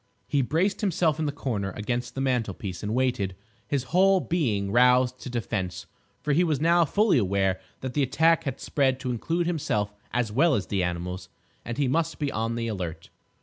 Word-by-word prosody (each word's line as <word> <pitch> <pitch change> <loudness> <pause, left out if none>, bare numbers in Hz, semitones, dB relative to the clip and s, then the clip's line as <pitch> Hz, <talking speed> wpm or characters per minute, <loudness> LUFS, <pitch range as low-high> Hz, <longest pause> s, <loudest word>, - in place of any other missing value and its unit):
He 140 - +2
braced 165 - 0
himself 165 -6 +1
in 155 - 0
the - - 0
corner 115 -9 -3
against 120 +3 -3
the 135 - -2
mantelpiece 110 -8 -2
and 105 +2 -2
waited, 125 -8 0 0.3
his 140 -3 0
whole 190 +1 +5
being 115 - 0
roused 125 +2 +4
to - - -7
defence, 105 -7 -3 0.4
for 150 - +1
he 170 +5 +4
was 155 -6 +1
now 170 +2 +4
fully 205 - +3
aware 95 -2 +1 0.2
that 130 -1 -4
the 145 - +1
attack 160 +5 +3
had 135 -1 -3
spread 135 -2 +1
to 125 - -2
include 165 +9 -1
himself 110 - -1 0.2
as 120 -3 0
well 145 +7 +4
as 100 - -1
the 100 -2 -1
animals, 90 +1 -3 0.3
and 120 - -5
he 145 -2 +1
must 165 +5 0
be 145 -2 -1
on 115 +1 -2
the 115 0 -2
alert. 90 -7 -5
125 Hz, 190 wpm, -26 LUFS, 105-155 Hz, 0.4 s, whole